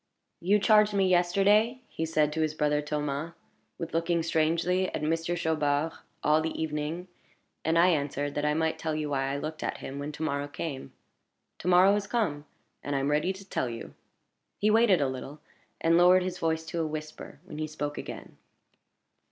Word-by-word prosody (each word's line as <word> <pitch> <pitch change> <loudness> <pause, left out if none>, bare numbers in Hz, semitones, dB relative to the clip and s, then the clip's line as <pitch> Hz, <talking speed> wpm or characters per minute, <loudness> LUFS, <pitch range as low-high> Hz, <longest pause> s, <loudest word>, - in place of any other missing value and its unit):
"You 195 +5 +3
charged 210 0 +4
me 195 -1 +3
yesterday," 200 +7 +3
he 160 - -4
said 155 -2 +1
to 160 - -1
his 155 -1 0
brother 150 -1 +1
Thomas, 150 +1 -3 0.4
"with 165 -1 -6
looking 170 0 +1
strangely 165 +3 +1
at - - -3
Monsieur 165 +2 0
Chaubard 155 -2 0 0.3
all 155 +1 +4
the 160 0 -3
evening; 160 +3 -3 0.6
and 160 +1 +2
I 175 +2 +6
answered, 145 -3 -1
that 145 - -2
I 150 0 +1
might 160 0 0
tell 160 -1 -2
you 150 -1 -3
why 135 -1 0
I 140 - -2
looked 155 +2 -5
at - - -2
him 140 +1 -7
when 145 +1 -4
to 155 - -5
morrow 140 -2 -1
came. 145 -1 -6 0.7
To - - -6
morrow 180 +2 +6
has 205 -1 -1
come, 150 -12 -1 0.4
and 145 - -3
I - - +2
am 140 +2 0
ready 150 +5 +2
to 190 +1 -10
tell 130 - -1
you." 115 -1 -7 0.6
He 210 +1 +2
waited 215 -6 +4
a 140 - +2
little, 130 +3 -6 0.4
and 165 +1 +4
lowered 180 +1 +6
his 180 0 -4
voice 160 0 0
to 165 +1 -3
a 160 - -1
whisper 155 -2 -7
when 155 -5 -8
he 155 - -2
spoke 145 -1 -4
again. - - -8
160 Hz, 195 wpm, -28 LUFS, 150-180 Hz, 0.7 s, I